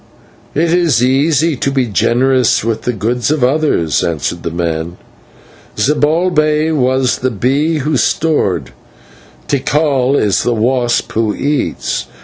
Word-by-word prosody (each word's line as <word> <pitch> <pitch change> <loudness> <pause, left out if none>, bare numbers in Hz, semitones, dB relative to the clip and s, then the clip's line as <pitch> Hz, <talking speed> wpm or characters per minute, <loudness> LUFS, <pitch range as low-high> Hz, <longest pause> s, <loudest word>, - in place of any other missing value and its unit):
"It 165 +3 +1
is 165 -10 +2
easy 150 +4 +2
to 135 - -1
be 135 -2 +1
generous 125 +3 +1
with 115 0 -2
the 125 - -1
goods 120 +4 -2
of 150 -3 0
others," 130 - +1
answered 85 +1 -2
the - - -3
man. 85 0 -3 0.8
"Zibalbay 155 +1 +1
was 130 -2 +1
the 130 - 0
bee 135 - 0
who 150 0 -1
stored; 145 - 0 0.8
Tikal 140 -1 +1
is 100 -3 +1
the 120 - 0
wasp 120 +1 0
who 110 -1 -1
eats. 145 0 -2
130 Hz, 130 wpm, -14 LUFS, 115-150 Hz, 0.8 s, is